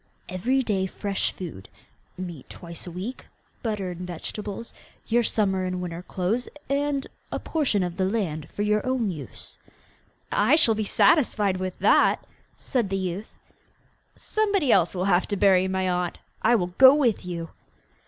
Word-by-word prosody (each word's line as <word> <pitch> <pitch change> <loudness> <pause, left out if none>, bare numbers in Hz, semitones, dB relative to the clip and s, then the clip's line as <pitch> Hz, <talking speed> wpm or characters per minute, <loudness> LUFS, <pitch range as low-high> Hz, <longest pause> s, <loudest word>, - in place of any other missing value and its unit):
'Every 250 +9 0
day 195 -5 0
fresh 200 +1 -2
food, 160 - -8 0.5
meat 175 -6 -7
twice 170 0 -8
a - - -6
week, 190 +9 -6 0.3
butter 210 -5 -2
and 175 - -8
vegetables, 205 +5 -6 0.3
your 235 +1 +3
summer 195 -4 +1
and 185 0 -2
winter 175 -1 -5
clothes, 195 +7 -2 0.2
and 280 0 0 0.3
a - - -1
portion 270 - 0
of 180 +1 -4
land 185 -6 -1
for 205 - -3
your 210 0 +2
own 255 -6 0
use.' 155 -5 -9 0.7
'I - - +4
shall 275 -8 +5
be 215 0 -2
satisfied 210 - +3
with 185 -1 -4
that,' - - +4 0.3
said 240 -7 -1
the 195 - 0
youth. 190 +3 -3 0.9
'Somebody 405 - +1
else 180 -1 +3
will 180 +1 -1
have 185 -2 +3
to 205 - -2
bury 190 -1 +4
my 190 0 0
aunt. 180 -1 -1 0.2
I 240 - +4
will 180 -4 -1
go 265 +1 +10
with 250 -8 +2
you! 170 -2 -5
195 Hz, 155 wpm, -25 LUFS, 180-230 Hz, 0.9 s, go